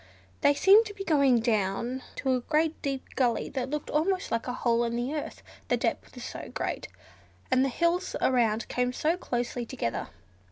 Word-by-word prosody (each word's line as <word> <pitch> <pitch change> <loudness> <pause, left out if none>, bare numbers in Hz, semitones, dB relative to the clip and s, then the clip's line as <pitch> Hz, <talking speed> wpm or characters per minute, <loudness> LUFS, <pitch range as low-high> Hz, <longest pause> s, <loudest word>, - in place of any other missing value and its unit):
They 285 - +5
seemed 410 +8 +6
to 410 - -9
be 395 - -5
going 280 -8 +4
down 225 +3 0
to 265 -1 0
a 255 - +2
great 315 +4 0
deep 275 -2 -2
gully 245 -3 +1
that 260 -1 -3
looked 300 +1 -4
almost 360 +5 0
like 230 +1 -1
a 250 - -2
hole 235 -1 +1
in 235 0 -1
the 245 +4 -2
earth, 300 - -5 0.2
the - - +2
depth - - -2
was - - -8
so - - -7
great, - - -3 0.6
and 260 0 +4
the 270 - +1
hills 340 +6 0
around 230 -3 +2
came 250 0 0
so 315 +6 +1
closely 245 -7 -3
together. 230 - -3
260 Hz, 190 wpm, -28 LUFS, 240-305 Hz, 0.6 s, seemed